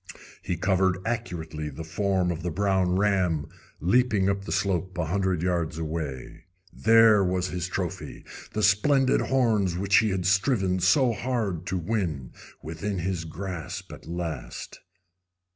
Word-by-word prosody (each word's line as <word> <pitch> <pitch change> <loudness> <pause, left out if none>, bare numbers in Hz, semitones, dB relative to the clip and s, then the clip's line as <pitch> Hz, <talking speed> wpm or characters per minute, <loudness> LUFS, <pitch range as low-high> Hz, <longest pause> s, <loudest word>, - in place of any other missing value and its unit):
He 90 -1 -3
covered 95 0 +2
accurately 80 -10 -4
the 75 +3 -7
form 90 +2 0
of 85 0 -4
the 90 - -2
brown 95 0 +1
ram 95 -6 +1 0.3
leaping 100 +1 +2
up 100 0 -4
the - - -5
slope 95 -1 -1
a 90 - 0
hundred 95 -1 0
yards 85 -3 -1
away. 80 -5 -5 0.3
There 115 -2 +5
was 90 0 0
his 90 0 -3
trophy, 95 -2 -5 0.3
the 110 - -1
splendid 130 +7 +3
horns 110 -9 +1
which 100 +1 +3
he 110 -1 +4
had 95 -2 -2
striven 95 -1 +2
so 115 +8 +4
hard 105 -8 -2
to 95 - -1
win, 85 - -2 0.3
within 85 +6 -4
his 90 -1 -2
grasp 85 +1 -6
at - - -12
last. 85 -6 -5
95 Hz, 145 wpm, -26 LUFS, 85-100 Hz, 0.3 s, There